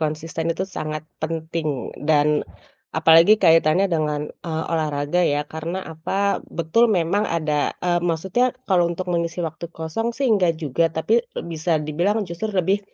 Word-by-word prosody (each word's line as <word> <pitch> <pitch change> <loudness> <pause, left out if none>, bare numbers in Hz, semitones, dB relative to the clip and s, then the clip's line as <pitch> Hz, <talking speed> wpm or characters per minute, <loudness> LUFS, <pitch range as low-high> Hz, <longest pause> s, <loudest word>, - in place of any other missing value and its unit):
konsisten 160 +1 -3
itu 165 +3 -1
sangat 155 -5 -5 0.2
penting, 160 -3 -3 0.2
dan, 150 0 +4 0.6
apalagi 165 +6 +6
kaitannya 165 +3 +5
dengan, 150 -2 0 0.2
eee, 160 -1 -3
olahraga 150 +1 0
ya, 145 -3 +1
karena, 165 +5 -5
apa, 185 +5 -1
betul 170 +9 +2
memang 195 +1 +1
ada, 155 -3 -1
eee, 175 -1 +2
maksudnya 190 +9 0
kalau 175 -3 +3
untuk 180 +1 -3
mengisi 170 0 -1
waktu 160 +1 -6
kosong 165 +8 -3
sih 275 - -1
enggak 180 -6 +2
juga, 160 +1 0
tapi 170 +9 +1 0.2
bisa 165 0 -1
dibilang, 175 +8 0
justru 175 +5 -4
lebih, 190 +3 +2
165 Hz, 145 wpm, -22 LUFS, 155-185 Hz, 0.6 s, apalagi